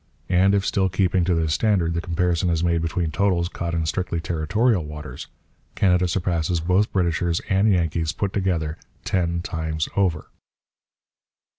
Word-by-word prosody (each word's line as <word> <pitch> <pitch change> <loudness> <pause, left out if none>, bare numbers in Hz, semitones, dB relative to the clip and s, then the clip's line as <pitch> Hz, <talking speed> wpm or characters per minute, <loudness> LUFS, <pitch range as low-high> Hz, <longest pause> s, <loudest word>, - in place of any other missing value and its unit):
And 95 +2 +4
if, 100 -1 +1
still 95 -1 +1
keeping 90 -1 +1
to 90 -1 +2
this 80 -2 0
standard, 95 -6 +1
the 85 - -1
comparison 90 0 0
is 85 -1 0
made 85 -1 +1
between 85 0 -1
totals 90 -1 +1
caught 85 -1 -4
in 80 -1 0
strictly 85 +1 -2
territorial 90 +5 +1
waters, 75 0 -8 0.5
Canada 90 -1 +3
surpasses 85 -1 0
both 90 +5 +1
Britishers 85 -2 0
and 100 +2 +3
Yankees, 80 -3 0
put 95 +2 -3
together, 85 -5 -1 0.3
ten 85 -2 0
times 80 -2 -2
over. 90 -6 0
85 Hz, 150 wpm, -23 LUFS, 80-95 Hz, 0.5 s, And